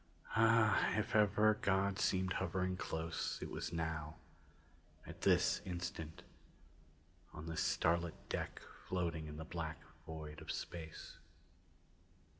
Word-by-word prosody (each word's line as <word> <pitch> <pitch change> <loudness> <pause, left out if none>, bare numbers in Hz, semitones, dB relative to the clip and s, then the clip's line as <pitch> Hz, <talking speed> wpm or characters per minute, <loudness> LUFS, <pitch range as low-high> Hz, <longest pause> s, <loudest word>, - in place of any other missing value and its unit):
Ah, 110 -1 +5
if 105 +1 0
ever 105 0 +5
God 95 0 +2
seemed 95 -1 +2
hovering 95 0 0
close, 80 -2 -2
it - - -5
was - - -3
now 80 -2 -2 0.9
at - - -10
this - - +4
instant, 85 -3 -5 1.1
on 75 - -7
this 80 -1 -2
starlit 85 0 +2
deck - - -3 0.2
floating 85 -4 -1
in 75 0 -7
the 80 - -5
black 80 -1 -4 0.3
void 80 -1 -6
of - - -4
space. 80 -3 -6
85 Hz, 115 wpm, -38 LUFS, 80-95 Hz, 1.1 s, Ah